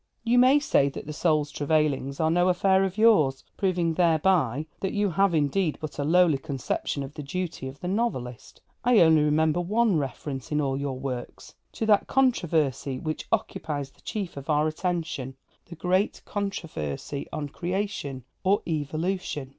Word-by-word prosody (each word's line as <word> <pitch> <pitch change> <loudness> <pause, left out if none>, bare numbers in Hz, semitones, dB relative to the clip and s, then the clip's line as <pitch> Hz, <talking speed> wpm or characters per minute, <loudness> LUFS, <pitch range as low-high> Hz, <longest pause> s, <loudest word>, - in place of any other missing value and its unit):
You 240 +1 +3
may 260 +3 +6
say 210 - +2
that - - -8
the 150 - -6
soul's 150 -2 +1
travailings 145 -2 0
are 160 -1 +2
no 175 +2 +3
affair 190 +1 +3
of 190 +1 -2
yours; 180 -13 +4
proving 180 -4 0
thereby 160 -5 +2
that 190 - -2
you 205 -2 +1
have 195 +1 +2
indeed 155 +3 +1
but 155 -1 -7
a - - +1
lowly 165 -1 +4
conception 140 0 -3
of 135 +1 -8
the 150 - -7
duty 160 -1 -4
of 130 +1 -9
the 180 - -4
novelist. 180 - -3 0.2
I 245 -1 +4
only 160 -2 +6
remember 155 +3 +2
one 210 +1 +2
reference, 135 0 -5
in 150 - +1
all 135 -2 0
your 135 -1 -3
works, 130 -2 -6 0.2
to 225 - -2
that 210 -2 +3
controversy 160 - +1
which 155 +3 -4
occupies 145 -3 -2
the - - -26
chief 195 -8 -5
of 140 +1 -8
our 150 0 +3
attention 160 -5 -3 0.3
the 170 - -9
great 185 +5 0
controversy 155 - -4
on 150 -2 -4
Creation 175 -6 -3 0.2
or 200 +2 +2
Evolution. 155 -1 -2
160 Hz, 165 wpm, -26 LUFS, 140-190 Hz, 0.3 s, may